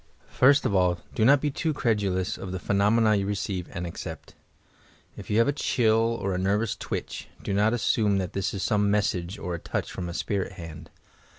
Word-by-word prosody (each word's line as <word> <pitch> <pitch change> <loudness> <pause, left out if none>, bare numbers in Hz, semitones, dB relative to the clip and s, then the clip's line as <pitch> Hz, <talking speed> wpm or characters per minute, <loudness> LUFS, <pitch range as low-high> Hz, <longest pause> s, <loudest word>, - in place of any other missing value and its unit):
First 140 +3 +4
of - - +1
all, 90 -2 +3 0.2
do 110 - +1
not 135 +4 +6
be 150 - 0
too 155 +2 -2
credulous 100 -6 0
of 95 - -7
the 95 - -3
phenomena 105 +4 +3
you 100 -1 0
receive 95 -3 -3
and 90 -2 -4
accept. 85 - -7 0.8
If - - -10
you 105 - +1
have 115 - +4
a - - +3
chill 115 -4 +2
or 95 -1 -1
a 90 - -1
nervous 100 +3 0
twitch, - - -5 0.2
do - - -2
not 105 +2 +3
assume 110 -3 +2
that 95 -3 -3
this 95 +1 -1
is 100 - -4
some 105 -1 +2
message 95 -3 0
or 90 - -4
a 85 - -3
touch - - -4
from 90 -2 -5
a 85 - -6
spirit 100 +2 -2
band. 80 -1 -9
100 Hz, 205 wpm, -26 LUFS, 90-110 Hz, 0.8 s, not